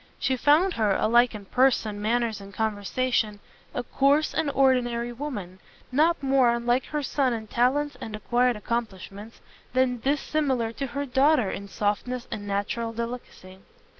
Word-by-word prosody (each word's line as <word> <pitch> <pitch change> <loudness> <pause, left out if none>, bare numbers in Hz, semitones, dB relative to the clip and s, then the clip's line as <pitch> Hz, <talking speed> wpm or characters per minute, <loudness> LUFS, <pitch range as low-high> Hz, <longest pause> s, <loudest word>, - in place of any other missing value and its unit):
She 265 - 0
found 305 +8 +3
her, 210 -6 +1
alike 235 +1 +3
in 205 -2 -8
person, 225 -3 +1
manners 225 -1 0
and 200 0 -11
conversation, 215 +1 -1 0.3
a 245 - -3
coarse 280 +5 +2
and 310 -2 0
ordinary 245 -3 +1
woman, 210 -9 -6 0.3
not 310 +3 +2
more 265 -2 +4
unlike 240 +2 +1
her 300 -1 -3
son 270 -2 +1
in 220 -1 -4
talents 265 +6 +1
and 215 - -5
acquired 245 +3 +1
accomplishments, 210 -1 -5 0.3
than 255 -1 +2
dissimilar 270 -3 0
to 275 +4 -4
her 280 +3 -3
daughter 270 -4 +3
in 200 - -6
softness 215 +5 -2
and 205 -1 -5
natural 210 +3 -2
delicacy. 230 -5 -7
240 Hz, 145 wpm, -26 LUFS, 215-270 Hz, 0.3 s, more